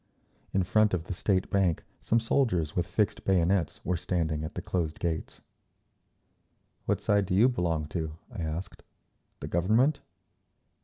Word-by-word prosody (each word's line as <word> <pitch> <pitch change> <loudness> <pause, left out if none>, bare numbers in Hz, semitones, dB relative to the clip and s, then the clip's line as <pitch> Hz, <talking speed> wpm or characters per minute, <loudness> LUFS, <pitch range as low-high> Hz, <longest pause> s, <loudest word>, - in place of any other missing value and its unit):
In 95 - +2
front 110 0 +3
of 85 - -3
the 95 - -5
State 95 +1 0
Bank 95 -5 +2 0.2
some 115 - +2
soldiers 110 - +1
with 90 -1 0
fixed 105 -1 0
bayonets 95 -1 +1
were 90 - +1
standing 80 -3 -1
at 80 - -6
the - - -3
closed 80 -4 -2
gates. 80 -2 -3 1.5
"What - - +1
side 100 -2 +2
do 90 - 0
you 110 +6 +6
belong 85 -10 0
to?" 80 -2 -4
I 110 -7 -6
asked. 80 +3 -4 0.6
"The - - -4
Government?" 110 - +2
90 Hz, 150 wpm, -29 LUFS, 80-105 Hz, 1.5 s, you